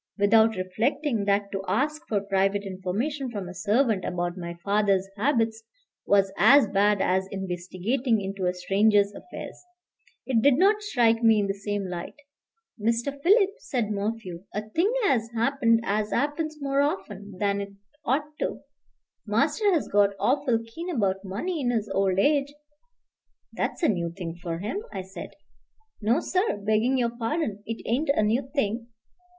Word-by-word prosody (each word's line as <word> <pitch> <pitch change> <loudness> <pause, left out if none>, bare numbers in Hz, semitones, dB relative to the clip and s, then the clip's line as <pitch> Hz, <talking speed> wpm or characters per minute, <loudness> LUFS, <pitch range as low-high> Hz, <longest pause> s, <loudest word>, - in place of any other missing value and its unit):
without 220 +2 +4
reflecting 220 +5 -1
that 200 0 +1
to 195 - -3
ask 290 +11 0
for 210 - +1
private 195 0 0
information 205 +10 -3
from 205 -6 -5
a 180 - -8
servant 215 +1 +1
about 175 0 -2
my 170 -2 -6
father's 200 -2 +2
habits 225 -1 +1 0.5
was 195 -1 +3
as 275 +6 +7
bad 205 +1 +3
as 190 0 +1
investigating 195 +6 -1
into 195 -1 -3
a 180 - +1
stranger's 200 +3 +3
affairs. 360 - -9 0.6
It 240 -4 +2
did 275 +1 +5
not 410 +5 +4
strike 240 - +2
me 225 -2 +5
in 205 - +1
the 195 - -1
same 205 0 -3
light. 175 -1 -6 0.6
"Mr. 230 +6 0
Philip," 395 +4 +4
said 250 - -2
Morphew, 200 -4 -4
"a 210 +1 -3
thing 360 - +2
'as 230 - +2
'appened 230 -1 +2
as 210 0 -1
'appens 310 +2 -1
more 275 0 +1
often 200 -6 -3
than 200 0 0
it 200 0 -7 0.3
ought 275 +5 +1
to. - - -3 0.7
Master 295 - +2
has 335 -5 +1
got 200 -1 +3
awful 255 +3 +2 0.2
keen 340 +6 -5
about 195 - 0
money 285 - -3
in 245 - 0
his 225 -3 0
old 195 -1 +1
age." 285 +6 +2 1.0
"That's - - -3
a - - +5
new 170 -4 -1
thing 170 -2 -6
for 165 -2 -3
him," 215 - -3
I 190 -2 -5
said. 190 +1 -9 0.7
"No, 220 +4 +2
sir, 370 - 0
begging 215 +5 +1
your 235 -1 0
pardon, 230 -3 -2
it 225 0 -5
ain't 270 +8 0
a 215 - +2
new 240 +5 0
thing. 230 -2 -1
215 Hz, 160 wpm, -26 LUFS, 195-270 Hz, 1.0 s, as